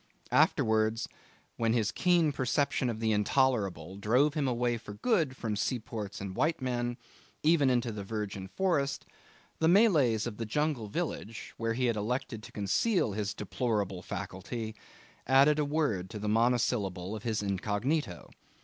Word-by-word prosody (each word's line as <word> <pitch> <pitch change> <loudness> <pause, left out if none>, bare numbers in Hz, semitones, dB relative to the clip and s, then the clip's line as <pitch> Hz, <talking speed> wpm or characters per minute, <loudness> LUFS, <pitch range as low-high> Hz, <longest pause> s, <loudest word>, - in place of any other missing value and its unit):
Afterwards, 110 0 +3 0.5
when 115 -1 +1
his 110 -3 +1
keen 175 -4 +3
perception 130 -1 0
of 110 -2 -3
the 110 -1 +1
Intolerable 105 - +1
drove 125 +9 +3
him 150 -4 0
away 120 -1 0
for 105 - -9
good 160 - +1
from 110 -3 -2
seaports 110 -2 -3
and 95 -1 -6
white 160 +1 +1
men, 120 -2 -2 0.5
even 155 -3 +4
into 120 -2 +1
the 105 -2 -5
virgin 100 -2 -4
forest, 140 - 0 0.5
the 160 - +3
Malays 160 - +4
of 115 -4 -5
the 115 - -3
jungle 150 -2 -1
village, 115 -4 -4
where 115 0 -1
he 125 +2 0
had 115 -3 +1
elected 115 +1 -2
to - - -11
conceal 110 - +1
his 105 0 -3
deplorable 105 -3 -2
faculty, 110 +5 -5 0.5
added 140 +3 +5
a 150 - +2
word 140 - 0
to 110 - -6
the 105 0 -4
monosyllable 110 -4 +1
of 110 - -6
his 110 -2 -1
incognito. 105 - -2
115 Hz, 150 wpm, -30 LUFS, 105-135 Hz, 0.5 s, added